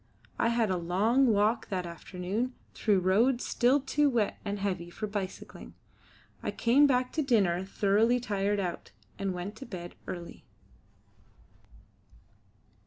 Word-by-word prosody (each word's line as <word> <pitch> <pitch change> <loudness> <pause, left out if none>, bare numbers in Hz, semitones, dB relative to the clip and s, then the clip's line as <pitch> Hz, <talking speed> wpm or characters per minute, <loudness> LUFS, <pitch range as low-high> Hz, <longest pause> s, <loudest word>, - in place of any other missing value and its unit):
I - - +3
had 230 -3 +1
a 185 - +1
long 205 +10 +2
walk 215 +1 +2
that 185 -2 -2
afternoon 185 +8 -4 0.2
through 205 -4 +2
roads 230 +8 +2
still 255 +4 +3
too 285 +2 +1
wet 230 -6 0
and 205 -1 -3
heavy 185 -4 -3
for 215 +5 -5
bicycling. 205 -2 -6 0.7
I - - -3
came 270 +5 +4
back 250 -2 +1
to 315 - 0
dinner 200 - +2
thoroughly 210 +5 +2
tired 205 -3 -1
out, 180 -3 -4 0.3
and 195 -1 -1
went 180 +3 -5
to 270 - -8
bed 175 -5 -7
early. 175 -1 -7
205 Hz, 135 wpm, -29 LUFS, 185-240 Hz, 0.7 s, came